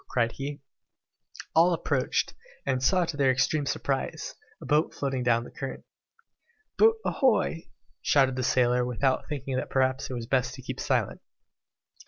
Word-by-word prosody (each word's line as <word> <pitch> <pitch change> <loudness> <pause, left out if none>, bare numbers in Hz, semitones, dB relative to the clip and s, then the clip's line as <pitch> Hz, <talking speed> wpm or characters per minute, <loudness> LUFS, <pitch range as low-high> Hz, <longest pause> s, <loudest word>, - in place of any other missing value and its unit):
cried 115 -2 +1
he. 140 +3 -6 1.0
All 170 +2 +5
approached, - - 0 0.3
and 130 -1 0
saw 180 +6 +3
to 165 - -5
their 140 -2 +3
extreme 140 +3 +1
surprise, 135 0 -2 0.3
a - - -10
boat 150 +2 +1
floating 135 -2 -2
down 120 -1 +2
the - - -11
current. 135 - -6 0.9
"Boat 450 +1 +5
ahoy!" 220 - +1 0.3
shouted 135 -2 +3
the 130 - -2
sailor, 125 -1 +2
without 125 +2 0
thinking 135 -3 -3
that - - -3
perhaps 130 0 +1
it - - -4
would 120 - -3
be - - -6
best 125 0 0
to 130 - -11
keep - - -6
silence. - - 0
135 Hz, 160 wpm, -27 LUFS, 125-145 Hz, 1.0 s, All